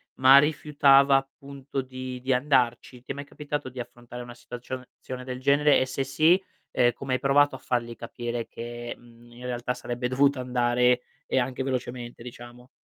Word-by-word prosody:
ma 130 +1 +8
rifiutava 140 -2 +4
appunto 135 0 -5
di 130 0 -7
di 130 +1 +1
andarci? 125 -2 +1
Ti - - -6
è 140 - -4
mai 140 - -6
capitato 145 -2 -5
di 130 0 -10
affrontare 120 0 -8
una 120 - -10
situacio 125 +1 -8 0.2
zione 125 0 -7
del 125 0 -6
genere, 140 +2 +4
e 130 - +1
se 130 +1 -2
sì, 155 +7 +3 0.3
ehm, 120 -1 +3
come 135 +2 -4
hai 130 - +1
provato 140 +1 +3
a - - -9
fargli 120 -1 -2
capire 120 0 -5
che, 120 0 -7
mhmm, 120 0 -19
in 120 +1 -12
realtà 125 0 -2
sarebbe 120 0 -4
dovuto 140 +2 +2
andare 125 0 +2 0.3
e - - 0
anche 130 +1 -2
velocemente 125 -2 -4
diciamo? 120 0 -11
125 Hz, 180 wpm, -26 LUFS, 120-135 Hz, 0.3 s, ma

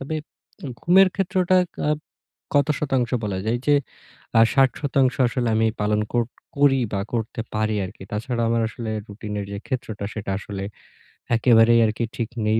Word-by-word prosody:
তবে 140 +4 -4 0.7
ঘুমের 190 +2 +6
ক্ষেত্রটা 185 -1 +2 0.3
আ - - +3 0.7
কত 140 - +3
শতাংশ 130 -5 0
বলা 100 -3 -2
যায় 110 +2 +1
এই - - -11
যে, 145 - +6 0.6
আ - - +8
৬০ 135 -1 +5
শতাংশ 135 -3 +2
আসলে 120 0 -1
আমি 110 0 +3
পালন 105 0 +1
কো 120 - +2 0.4
করি 140 -2 +4
বা 100 - 0
করতে 115 0 -2
পারি 110 0 0
আর 90 - -8
কি। - - -11
তাছাড়া 115 +3 -2
আমার 115 0 +2
আসলে 110 0 -6 0.2
রুটিনের 105 0 -5
যে, 100 - -4
ক্ষেত্রটা 110 -6 -4
সেটা 100 -2 -4
আসলে 100 -1 -6 0.7
একেবারেই 115 0 +5
আর 110 - +1
কি 115 - 0
ঠিক 115 -2 -2 0.2
নেই 110 +1 +3
115 Hz, 170 wpm, -23 LUFS, 105-135 Hz, 0.7 s, আ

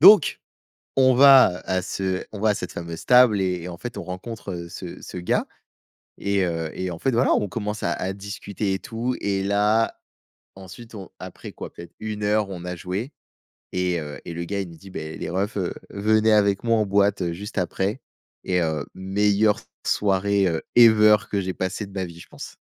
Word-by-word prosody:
Donc, 195 0 +8 0.6
on 130 -1 +6
va 135 -9 +7
à 95 0 0
ce 95 0 -2
on 105 - -6
va 110 - +3
à - - +4
cette - - -5
fameuse 85 -1 -6
table 125 -5 +6
et 90 -2 -1
en 85 - -8
fait 120 +4 -7
on - - -4
rencontre, 100 +2 -6
heu, 85 -1 -6
ce 85 0 -8
ce - - -8
gars 90 - 0 0.7
et 100 -1 +1
heu 80 -2 -2
et 95 0 -3
en 85 - -5
fait, 135 - 0
voilà, 120 +3 +3
on 105 - +1
commence 105 +3 -4
à 85 - +1
à 95 +1 -3
discuter 100 0 -4
et 95 - -2
tout 120 +6 -3
et 100 -1 0
là, 105 +3 +2 0.6
ensuite 95 +5 -11
on 95 -3 -8
après - - -9
quoi? - - -9
Peut-être 85 - -11
1 105 -1 -4
heure 105 -1 +1
on 90 -2 -7
a 90 0 -4
joué 100 - -4 0.6
et 90 -2 0
heu 75 -1 -7
et - - -6
le 85 0 -4
gars 100 +3 -3
il 95 - -4
me - - -12
dit: 95 +4 -14
«Beh 80 -2 -6
les - - -5
reufsn 100 +3 -1
heu, - - -6 0.2
venez 110 +2 +3
avec 100 0 +3
moi 115 -1 +3
en 105 - +1
boîte 100 -3 +2
juste 100 +5 -6
après» 95 +6 -1 0.4
et 90 -1 +1
heu, 80 -3 -1
meilleure 100 +2 +2 0.3
soirée, 100 0 +2
heu, 80 -3 0
ever 110 -2 +8
que 100 - 0
j'ai 95 -1 -3
passé 95 +3 -3
de 100 - -14
ma 95 -1 -2
vie 85 -1 -10
je - - -13
pense. - - -10
100 Hz, 205 wpm, -24 LUFS, 90-105 Hz, 0.7 s, Donc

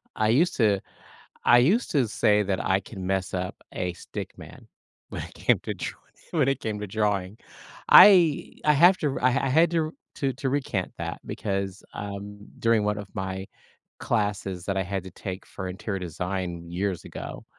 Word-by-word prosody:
I 110 0 +1
used 150 +10 +3
to 105 -5 +3 0.7
I 120 - +7
used 190 - +2
to 135 -6 +2
say 105 -1 +3
that 95 -2 -1
I 95 +1 +3
can 95 -2 -8
mess 95 -1 -1
up 90 0 -3 0.2
a 90 -1 -2
stick 85 - -8
man - - -12 0.4
when - - -5
it - - -10
came - - +2
to - - -4
dr - - -5 0.4
when 150 -6 +2
it 135 - 0
came 110 -2 -3
to 105 - -5
drawing. 105 -1 -1 0.5
I 175 -7 +7
I 150 - +6
have 175 +6 +6
to 145 -3 -1
I 125 - +5
I 135 +1 +1
had 160 +5 +4
to 160 -1 0 0.4
to 135 -2 -1
recant 130 -9 -1
that, 85 0 -4
because, 100 -1 -3
um, 100 0 -6 0.2
during 115 -2 +3
1 105 0 0
of 105 -1 -6
my 95 0 -4 0.5
classes 100 -5 -1
that 100 - -1
I 95 - +2
had 95 0 -3
to 95 - -10
take 95 +1 -7
for 95 -1 -7
interior 95 +1 -4
design 90 0 -4
years 95 0 -2
ago, - - -8
105 Hz, 180 wpm, -26 LUFS, 95-130 Hz, 0.7 s, I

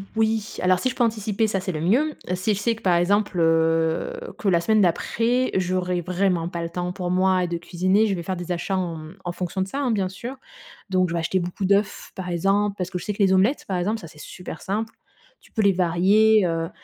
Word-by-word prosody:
Oui, 220 -1 0
alors 185 0 +3
si 255 - 0
je - - -5
peux 245 - +2
anticiper, 220 -1 0
ça, 195 -2 -1
c'est 185 0 -3
le 155 -2 -4
mieux. 270 - +2 0.2
Si 205 +4 0
je 200 - -3
sais 230 +2 +1
que, - - -15
par 180 -2 +3
exemple, 200 +1 +1
heu, 165 - +2 0.2
que 230 -6 -4
la 170 -3 +3
semaine 215 +3 +3
d'après, 230 +8 +1
j'aurai 180 -1 0
vraiment 180 -1 0
pas 170 -1 -4
le 165 - -3
temps 180 +1 -3
pour 180 -1 -4
moi 185 0 +2
de 170 0 -2
cuisiner, 185 +5 +1
je 200 - 0
vais 170 - -5
faire 190 +1 -3
des 175 0 -6
achats 180 +2 -1
en 170 -3 -2
mmh, 155 +4 -10
en 175 - -2
fonction 180 +1 -3
de 190 - -1
ça, 275 +8 -4
hein, 260 -4 0
bien 195 -4 0
sûr. 240 +7 -7 0.5
Donc, 185 -2 +2
je - - -3
vais 170 - 0
acheter 185 +3 0
beaucoup 180 +2 -3
d'œufs 200 +1 +1
par 180 -1 -5
exemple, 195 +4 +1
parce 180 -1 -3
que 180 -2 -4
je - - -8
sais 210 - -1
que 200 - +1
les 190 -1 +4
omelettes 205 +10 +2
par 190 -2 -1
exemple, 210 +5 -1
ça, 165 - -10
c'est 150 -1 -16
super 170 +1 -9
simple. 220 +3 -3 0.5
Tu - - -22
peux 220 - 0
les 200 - +5
varier, 190 +4 +4
heu. 165 0 -1
185 Hz, 250 wpm, -23 LUFS, 175-210 Hz, 0.5 s, les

